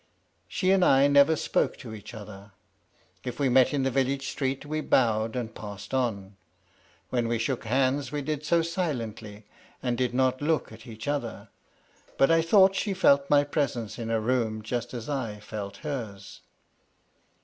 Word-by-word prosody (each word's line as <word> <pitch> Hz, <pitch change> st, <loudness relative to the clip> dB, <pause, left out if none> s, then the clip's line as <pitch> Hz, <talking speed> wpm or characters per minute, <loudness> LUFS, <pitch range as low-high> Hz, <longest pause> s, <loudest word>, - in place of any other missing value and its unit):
She 185 Hz, -1 st, 0 dB
and 190 Hz, -1 st, +4 dB
I 135 Hz, -4 st, +5 dB
never 145 Hz, +2 st, +5 dB
spoke -, -, 0 dB
to 115 Hz, -5 st, -9 dB
each 105 Hz, +2 st, -10 dB
other. 100 Hz, -1 st, -11 dB, 0.7 s
If 125 Hz, +1 st, -6 dB
we 140 Hz, -2 st, +2 dB
met 130 Hz, 0 st, +5 dB
in 140 Hz, -2 st, 0 dB
the 135 Hz, -, +1 dB
village 135 Hz, +1 st, 0 dB
street 135 Hz, 0 st, -2 dB
we 155 Hz, +1 st, -2 dB
bowed 110 Hz, -5 st, +2 dB
and 120 Hz, -3 st, -4 dB
passed 105 Hz, +2 st, -9 dB
on; 100 Hz, -7 st, -2 dB, 0.7 s
when 120 Hz, -2 st, 0 dB
we 115 Hz, 0 st, 0 dB
shook 115 Hz, +2 st, -2 dB
hands 130 Hz, +2 st, +1 dB
we 145 Hz, -1 st, -3 dB
did 150 Hz, 0 st, -3 dB
so 165 Hz, +2 st, +2 dB
silently, 115 Hz, -, -4 dB, 0.4 s
and 125 Hz, -2 st, 0 dB
did 125 Hz, 0 st, -1 dB
not 130 Hz, 0 st, +1 dB
look 155 Hz, -4 st, 0 dB
at 110 Hz, +1 st, -13 dB
each 110 Hz, +1 st, -9 dB
other. 120 Hz, -8 st, -3 dB, 0.7 s
But 135 Hz, -, +4 dB
I 165 Hz, 0 st, +5 dB
thought 190 Hz, +3 st, +5 dB
she 200 Hz, 0 st, -1 dB
felt 140 Hz, -5 st, +4 dB
my 145 Hz, -1 st, +5 dB
presence 125 Hz, -7 st, -2 dB
in 115 Hz, -1 st, -4 dB
a 115 Hz, -1 st, +1 dB
room 110 Hz, -2 st, -1 dB
just 120 Hz, +2 st, -4 dB
as 120 Hz, -1 st, -6 dB
I 115 Hz, -8 st, -3 dB
felt 105 Hz, -1 st, -7 dB
hers. 110 Hz, -9 st, -6 dB
125 Hz, 170 wpm, -27 LUFS, 110-145 Hz, 0.7 s, I